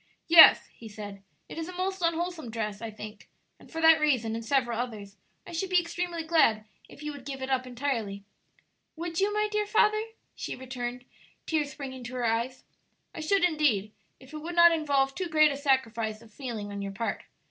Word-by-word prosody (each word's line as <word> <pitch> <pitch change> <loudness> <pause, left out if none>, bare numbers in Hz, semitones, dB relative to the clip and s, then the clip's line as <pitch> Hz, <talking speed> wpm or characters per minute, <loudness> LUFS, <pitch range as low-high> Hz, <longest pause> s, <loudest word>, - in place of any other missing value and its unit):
"Yes," 330 -1 +9
he 225 - -11
said; 205 -1 -9 0.3
"it - - -7
is 325 +2 -5
a - - -7
most 380 +1 -2
unwholesome 335 -4 -1
dress, 215 -2 -4
I 230 - -4
think; 215 0 -10 0.3
and - - -17
for 325 - -5
that 320 0 +7
reason 250 -7 +1
and 230 0 -4
several 240 -2 0
others 210 -5 -5 0.3
I - - -10
should 345 +3 -3
be 365 -1 +5
extremely 345 0 -3
glad 310 -10 +3 0.2
if 295 - -13
you 300 - -3
would 285 -2 -10
give 270 -1 -6
it 265 - -4
up 255 -1 0
entirely." 235 -6 -3 0.7
"Would 330 0 -4
you, 400 +2 +2
my 425 0 +1
dear 425 -1 0
father?" 430 0 +3 0.3
she - - -5
returned, 250 -1 -6 0.4
tears 305 -3 0
springing 260 -3 -7
to 250 +1 -7
her 245 -1 -1
eyes. 235 +3 -1 0.5
"I - - -8
should 370 +5 +1
indeed, 295 - +2 0.3
if 260 +3 -16
it 305 - -5
would 335 +3 -6
not 340 0 +8
involve 285 -4 +1
too 370 +3 -3
great 310 -1 +5
a - - -3
sacrifice 230 -6 0
of 220 -2 -18
feeling 225 -6 -6
on 200 0 -5
your 200 0 -5
part. 230 +3 -3
270 Hz, 200 wpm, -28 LUFS, 230-330 Hz, 0.7 s, Yes